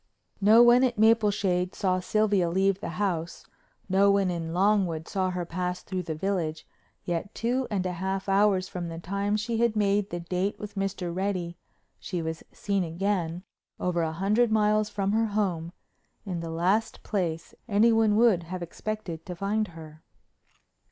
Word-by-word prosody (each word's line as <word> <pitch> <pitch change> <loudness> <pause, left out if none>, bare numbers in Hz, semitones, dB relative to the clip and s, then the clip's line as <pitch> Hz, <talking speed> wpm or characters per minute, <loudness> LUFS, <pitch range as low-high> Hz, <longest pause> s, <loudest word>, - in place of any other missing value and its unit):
No 220 +4 +7
one 240 +1 +6
at 245 -3 +1
Mapleshade 205 -5 +2
saw 185 -2 +1
Sylvia 200 -2 +1
leave 190 +2 +1
the - - -5
house, 170 -5 -2 0.4
no 195 +1 +4
one 200 -2 +3
in 165 -2 -4
Longwood 180 -3 +1
saw 190 -2 -1
her 180 -1 -3
pass 180 +1 -3
through 185 -1 -3
the 165 -3 -4
village, 160 -3 -2 0.4
yet, 175 +3 -3
two 250 +3 -1
and 195 -4 -1
a 185 - -1
half 190 +2 -3
hours 195 -1 +3
from 175 -2 -5
the 165 - -6
time 200 +4 -1
she 225 +2 -2
had 235 -1 +2
made 205 -1 +1
the 175 - -4
date 180 +3 -2
with 210 0 -8
Mr. 195 -3 -3
Reddy, 185 -3 -2 0.4
she 180 - -4
was 160 0 -4
seen 200 -2 -1
again, 175 0 -2 0.4
over 180 -1 0
a 160 -1 0
hundred 210 +7 +1
miles 215 0 +2
from 200 -1 -1
her 225 +1 +2
home, 185 -6 -1 0.5
in 180 -4 -3
the 165 0 -5
last 185 +7 0
place 170 -5 -2 0.2
anyone 220 0 +4
would 220 -5 +4
have 175 +1 -6
expected 175 -2 -5
to 180 - -5
find 210 +4 -1
her. 160 -2 -12
195 Hz, 165 wpm, -27 LUFS, 175-210 Hz, 0.5 s, No